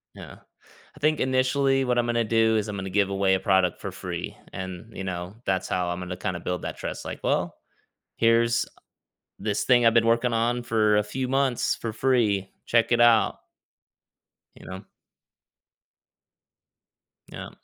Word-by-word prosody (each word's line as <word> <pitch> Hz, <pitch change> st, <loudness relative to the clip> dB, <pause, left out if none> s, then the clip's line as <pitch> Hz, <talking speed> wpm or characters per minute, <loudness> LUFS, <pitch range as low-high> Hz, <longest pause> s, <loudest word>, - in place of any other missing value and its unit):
Yeah. -, -, -11 dB, 0.6 s
I -, -, -15 dB
think 155 Hz, +1 st, +1 dB
initially 135 Hz, +1 st, +2 dB
what 125 Hz, 0 st, 0 dB
I'm 120 Hz, -, +2 dB
gonna 120 Hz, 0 st, +1 dB
do 110 Hz, 0 st, +2 dB
is 105 Hz, -, -1 dB
I'm 105 Hz, -, -5 dB
gonna 95 Hz, -1 st, -5 dB
give 100 Hz, 0 st, +1 dB
away 95 Hz, -1 st, +1 dB
a -, -, -1 dB
product 95 Hz, -3 st, +2 dB
for -, -, -5 dB
free -, -, -6 dB, 0.2 s
and, 95 Hz, +4 st, -7 dB
you 95 Hz, -, -5 dB
know, 90 Hz, +1 st, -5 dB
that's 95 Hz, -1 st, -1 dB
how 90 Hz, -1 st, -1 dB
I'm 90 Hz, -, -3 dB
gonna 90 Hz, 0 st, -6 dB
kinda 90 Hz, -1 st, -3 dB
build 90 Hz, -1 st, -3 dB
that -, -, -5 dB
trust, -, -, -6 dB
like, -, -, -6 dB
"Well, -, -, 0 dB, 0.6 s
here's 115 Hz, 0 st, +3 dB, 0.7 s
this 105 Hz, +1 st, -2 dB
thing 120 Hz, -2 st, +4 dB
I've 115 Hz, -, +5 dB
been 115 Hz, -1 st, +4 dB
working 115 Hz, +1 st, +2 dB
on 120 Hz, +2 st, 0 dB
for 110 Hz, -3 st, +2 dB
a -, -, +3 dB
few 125 Hz, +5 st, -4 dB
months 135 Hz, -2 st, +1 dB
for 115 Hz, -2 st, -5 dB
free, 110 Hz, -6 st, +1 dB, 0.2 s
check 115 Hz, 0 st, +2 dB
it 120 Hz, -, +3 dB
out." 120 Hz, -2 st, +4 dB, 1.2 s
You -, -, -15 dB
know? 95 Hz, +1 st, -7 dB, 2.5 s
Yeah. -, -, -8 dB
115 Hz, 165 wpm, -25 LUFS, 95-120 Hz, 2.5 s, I've